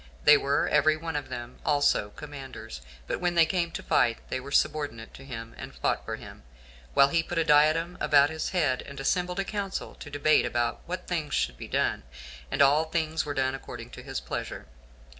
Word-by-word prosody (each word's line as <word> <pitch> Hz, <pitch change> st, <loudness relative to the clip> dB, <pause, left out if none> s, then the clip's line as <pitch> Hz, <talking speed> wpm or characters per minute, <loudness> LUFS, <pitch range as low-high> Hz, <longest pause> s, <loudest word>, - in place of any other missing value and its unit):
They -, -, +9 dB
were -, -, +1 dB
every 155 Hz, +1 st, +4 dB
one 165 Hz, 0 st, -5 dB
of 145 Hz, -2 st, -3 dB
them 120 Hz, 0 st, -7 dB
also 145 Hz, -8 st, +2 dB
commanders; 135 Hz, -, -8 dB, 0.2 s
but -, -, -3 dB
when 175 Hz, -1 st, +1 dB
they 170 Hz, -1 st, +6 dB
came 170 Hz, 0 st, 0 dB
to -, -, -5 dB
fight, 115 Hz, -1 st, +3 dB
they 130 Hz, -, -1 dB
were 135 Hz, +2 st, -9 dB
subordinate 145 Hz, -6 st, 0 dB
to 135 Hz, -, -11 dB
him, 115 Hz, -4 st, -7 dB
and -, -, -8 dB
fought -, -, 0 dB
for -, -, -3 dB
him, -, -, -12 dB, 0.5 s
while 140 Hz, -, +6 dB
he 165 Hz, +3 st, +2 dB
put 165 Hz, -, -5 dB
a 165 Hz, -, +4 dB
diadem 160 Hz, +3 st, +3 dB
about 145 Hz, +1 st, +5 dB
his 160 Hz, 0 st, -3 dB
head, 150 Hz, -9 st, +1 dB
and 140 Hz, 0 st, -10 dB
assembled 180 Hz, +6 st, 0 dB
a 195 Hz, -, 0 dB
council 200 Hz, -2 st, -4 dB
to 145 Hz, -, -10 dB
debate 145 Hz, +1 st, +3 dB
about 120 Hz, 0 st, -1 dB
what 180 Hz, +2 st, -4 dB
things 160 Hz, -4 st, -2 dB
should -, -, 0 dB
be -, -, -8 dB
done, -, -, 0 dB, 0.5 s
and 140 Hz, +1 st, +3 dB
all 145 Hz, +3 st, +4 dB
things 160 Hz, -1 st, -1 dB
were 145 Hz, -, -3 dB
done 130 Hz, 0 st, +1 dB
according 120 Hz, -3 st, -8 dB
to 125 Hz, -, -9 dB
his 135 Hz, +1 st, -4 dB
pleasure. -, -, -5 dB
145 Hz, 205 wpm, -28 LUFS, 130-165 Hz, 0.5 s, They